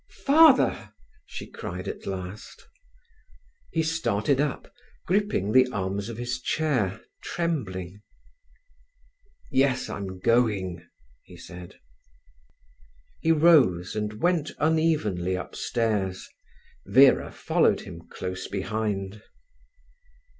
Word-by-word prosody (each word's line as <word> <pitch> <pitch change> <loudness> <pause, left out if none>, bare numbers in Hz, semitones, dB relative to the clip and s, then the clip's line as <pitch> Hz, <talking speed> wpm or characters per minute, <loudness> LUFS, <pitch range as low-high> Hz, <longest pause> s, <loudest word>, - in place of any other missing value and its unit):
"Father!" 300 -1 +5 0.3
she - - -7
cried - - -7
at - - -6
last. 95 +2 -7 1.0
He 160 - 0
started 140 -5 0
up, 145 -3 -3 0.3
gripping 190 - 0
the 130 +2 +5
arms 100 +1 -3
of 115 - -7
his 120 +1 -4
chair, 125 -11 -1 0.2
trembling. 105 - -3 1.5
"Yes, 130 -1 +1
I'm 95 -2 -6
going," 100 -6 +1 0.4
he - - -15
said. 90 0 -11 1.4
He 165 - +2
rose, 150 - +4
and 105 0 -2
went 155 +6 0
unevenly 150 - +1
upstairs. 100 -1 -2 0.6
Vera 135 +1 +5
followed - - +1
him 85 0 -11
close 95 0 -5
behind. 100 0 -3
110 Hz, 90 wpm, -26 LUFS, 95-150 Hz, 1.5 s, Father